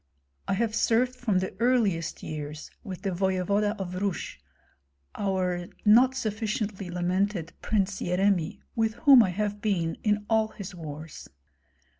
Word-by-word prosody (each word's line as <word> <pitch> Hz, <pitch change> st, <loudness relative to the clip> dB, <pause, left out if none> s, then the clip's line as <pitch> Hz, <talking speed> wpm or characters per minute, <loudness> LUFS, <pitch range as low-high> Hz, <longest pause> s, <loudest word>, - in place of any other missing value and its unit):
I -, -, +1 dB
have 220 Hz, +1 st, 0 dB
served 245 Hz, +3 st, +2 dB
from 230 Hz, -6 st, 0 dB
the 185 Hz, 0 st, -2 dB
earliest 215 Hz, -10 st, +1 dB
years 150 Hz, 0 st, -6 dB
with 185 Hz, -3 st, -7 dB
the 195 Hz, -, 0 dB
voevoda 195 Hz, +3 st, +1 dB
of 185 Hz, -2 st, -5 dB
Rus, 200 Hz, -3 st, -2 dB, 0.8 s
our 185 Hz, -3 st, -1 dB, 0.2 s
not 245 Hz, +5 st, +6 dB
sufficiently 210 Hz, -4 st, -3 dB
lamented 180 Hz, 0 st, -1 dB
Prince 200 Hz, -3 st, 0 dB
Yeremi, 180 Hz, -2 st, +1 dB
with 225 Hz, -1 st, +1 dB
whom 265 Hz, +1 st, +7 dB
I 205 Hz, -, +2 dB
have 205 Hz, +2 st, -2 dB
been 170 Hz, -6 st, 0 dB
in 210 Hz, -1 st, +1 dB
all 220 Hz, -1 st, +3 dB
his 200 Hz, -2 st, -9 dB
wars. 155 Hz, -2 st, -8 dB
200 Hz, 135 wpm, -27 LUFS, 180-215 Hz, 0.8 s, whom